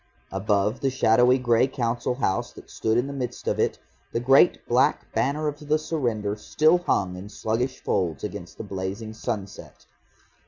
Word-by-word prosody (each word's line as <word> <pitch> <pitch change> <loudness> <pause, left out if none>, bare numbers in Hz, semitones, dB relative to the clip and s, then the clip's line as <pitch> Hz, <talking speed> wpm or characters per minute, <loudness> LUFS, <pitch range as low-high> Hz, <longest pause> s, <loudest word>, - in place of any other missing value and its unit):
Above 105 +4 0
the 135 -1 +1
shadowy 125 0 +4
grey 120 0 +3
Council 120 -1 -1
House 95 -7 -1
that - - -14
stood 110 +1 0
in 120 - +2
the 140 - -5
midst 125 -3 -5
of - - 0
it, - - +1 0.4
the - - +1
great 135 +7 +4
black 125 +2 +2
banner 150 +3 0
of 150 0 -3
the 155 +1 +3
surrender 120 -10 -2
still 155 +10 +3
hung 95 - 0
in 95 +3 -8
sluggish 115 +5 -2
folds 85 -6 -1
against 85 - -6
the - - -5
blazing 100 +2 -5
sunset. 110 -3 -6
120 Hz, 165 wpm, -25 LUFS, 105-135 Hz, 0.4 s, shadowy